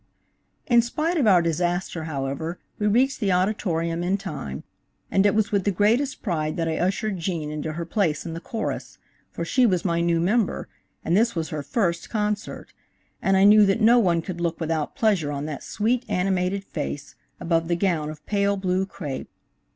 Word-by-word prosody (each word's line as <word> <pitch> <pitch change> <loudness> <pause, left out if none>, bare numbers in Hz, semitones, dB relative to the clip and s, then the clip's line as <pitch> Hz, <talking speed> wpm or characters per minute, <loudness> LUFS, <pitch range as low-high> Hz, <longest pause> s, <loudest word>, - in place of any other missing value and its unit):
In 240 -1 +5
spite 310 +9 -1
of 270 -8 +2
our 180 -4 +6
disaster, 175 0 -1
however, 145 +3 -3 0.2
we 210 - +1
reached 255 +6 +2
the 205 -5 +1
Auditorium 175 -3 0
in 185 +3 +1
time, 130 - -6 0.5
and 195 +1 +4
it 205 - +2
was 215 -2 +1
with 200 -2 +1
the 205 - +1
greatest 230 +8 +1
pride 155 -6 -1
that 165 -1 0
I 160 -1 -1
ushered 195 +2 -1
Gene 165 -3 -3
into 155 +1 -4
her 170 +2 -4
place 165 -4 0
in 165 - -5
the 165 - -5
chorus, 220 +5 -4 0.3
for 170 - -5
she 250 +7 +3
was 185 -3 0
my 170 -2 +1
new 170 -1 +2
member, 205 +5 +1 0.4
and 170 - +2
this 230 +2 +3
was 160 -2 -2
her 155 - -3
first 170 - -1
concert, 210 -1 -3 0.5
and 195 0 +3
I 190 - +5
knew 210 +1 +8
that 195 +2 +2
no 235 +2 +6
one 170 -6 +2
could 175 -1 -5
look 170 -1 -1
without 160 -2 -2
pleasure 195 -10 +1
on 145 0 -3
that 150 -3 -5
sweet, 235 +4 0
animated 185 +1 0
face, 145 -5 -5 0.3
above 165 -1 0
the 170 - +1
gown 170 -5 0
of 150 -1 -10
pale 200 -1 +1
blue 190 0 0
crêpe. 150 -8 -6
180 Hz, 190 wpm, -24 LUFS, 165-210 Hz, 0.5 s, knew